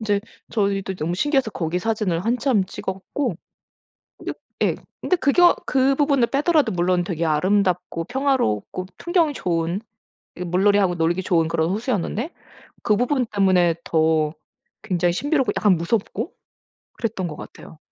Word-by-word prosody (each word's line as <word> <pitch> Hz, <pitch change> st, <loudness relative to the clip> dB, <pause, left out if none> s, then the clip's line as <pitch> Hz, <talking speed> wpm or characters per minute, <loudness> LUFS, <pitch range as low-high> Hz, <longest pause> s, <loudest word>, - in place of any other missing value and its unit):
인제 205 Hz, -2 st, +1 dB, 0.3 s
저희도 195 Hz, -3 st, 0 dB
너무 165 Hz, +2 st, -2 dB
신기해서 270 Hz, -, +1 dB
거기 175 Hz, -2 st, -2 dB
사진을 205 Hz, -4 st, -1 dB
한참 240 Hz, -3 st, +2 dB
찍었고 190 Hz, +5 st, -4 dB, 0.8 s
근데 -, -, -4 dB, 0.3 s
예. -, -, +2 dB, 0.3 s
근데 365 Hz, -, +1 dB
그게 340 Hz, +2 st, +3 dB, 0.2 s
그 270 Hz, 0 st, +3 dB
부분을 280 Hz, -4 st, +2 dB
빼더라도 295 Hz, -, +2 dB
물론 175 Hz, 0 st, +1 dB
되게 170 Hz, -2 st, -2 dB
아름답고 180 Hz, +1 st, +1 dB
평화롭고 245 Hz, -, -1 dB
풍경이 345 Hz, -4 st, +2 dB
좋은 170 Hz, 0 st, -1 dB, 0.6 s
이 180 Hz, -, -4 dB
물놀이하고 190 Hz, +1 st, +3 dB
놀기 170 Hz, +3 st, +1 dB
좋은 165 Hz, -3 st, +2 dB
그런 165 Hz, 0 st, 0 dB
호수였는데 225 Hz, -, -2 dB, 0.5 s
그 210 Hz, -, +3 dB
부분 250 Hz, +1 st, +1 dB
때문에 185 Hz, -5 st, +3 dB
더 160 Hz, -1 st, +2 dB, 0.5 s
굉장히 175 Hz, -1 st, 0 dB
신비롭고 285 Hz, -, +1 dB
약간 205 Hz, -3 st, +4 dB
무섭고 205 Hz, +6 st, -2 dB, 0.6 s
그랬던 210 Hz, -6 st, -3 dB
것 150 Hz, -, -6 dB
같아요. 160 Hz, -, -11 dB
195 Hz, 320 characters per minute, -22 LUFS, 175-245 Hz, 0.8 s, 약간